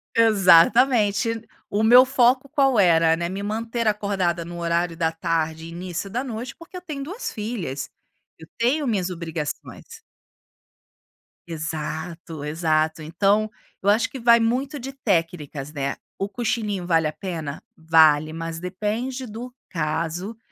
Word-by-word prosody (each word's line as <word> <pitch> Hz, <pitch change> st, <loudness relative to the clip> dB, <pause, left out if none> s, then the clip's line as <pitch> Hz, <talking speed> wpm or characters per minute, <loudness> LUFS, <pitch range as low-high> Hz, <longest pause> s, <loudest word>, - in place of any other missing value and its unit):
Exatamente. 225 Hz, +2 st, +4 dB, 0.2 s
O 210 Hz, +2 st, 0 dB
meu 245 Hz, +3 st, +8 dB
foco 260 Hz, +1 st, +3 dB
qual 270 Hz, -5 st, +2 dB
era, 165 Hz, -4 st, +5 dB
né, 170 Hz, +1 st, -3 dB
me 195 Hz, +2 st, -4 dB
manter 225 Hz, +2 st, -2 dB
acordada, 195 Hz, -5 st, 0 dB
no 175 Hz, +1 st, -8 dB
horário 170 Hz, 0 st, 0 dB
da 165 Hz, -2 st, +1 dB
tarde 160 Hz, 0 st, -2 dB
e -, -, -8 dB
início 180 Hz, +2 st, -5 dB
da 240 Hz, +5 st, -2 dB
noite, 240 Hz, -1 st, -5 dB
porque 335 Hz, +3 st, -14 dB
eu 360 Hz, -, -6 dB
tenho 305 Hz, -6 st, -6 dB
2 385 Hz, -, -5 dB
filhas, 195 Hz, -, -4 dB, 0.5 s
eu 160 Hz, -, -12 dB
tenho 270 Hz, +6 st, +1 dB
minhas 195 Hz, -6 st, 0 dB
obrigações. 165 Hz, -, -6 dB, 1.5 s
Exato, 160 Hz, 0 st, -5 dB
exato, 155 Hz, 0 st, 0 dB
então, 200 Hz, +7 st, +1 dB, 0.3 s
eu 200 Hz, -, +1 dB
acho 220 Hz, +2 st, +3 dB
que 265 Hz, -, -8 dB
vai 235 Hz, 0 st, +6 dB
muito 260 Hz, +5 st, -1 dB
de 265 Hz, +2 st, -7 dB
técnicas, 165 Hz, -, -2 dB
né, 140 Hz, -1 st, -2 dB, 0.2 s
o 195 Hz, +1 st, -2 dB
cochilinho 215 Hz, -4 st, -2 dB
vale 165 Hz, -3 st, +2 dB
a -, -, -2 dB
pena? 160 Hz, -5 st, -6 dB
Vale, 160 Hz, -2 st, +4 dB
mas 165 Hz, 0 st, -5 dB
depende 215 Hz, +8 st, -3 dB
do 235 Hz, +3 st, -8 dB, 0.2 s
caso, 165 Hz, +6 st, -3 dB
190 Hz, 140 wpm, -23 LUFS, 165-230 Hz, 1.5 s, meu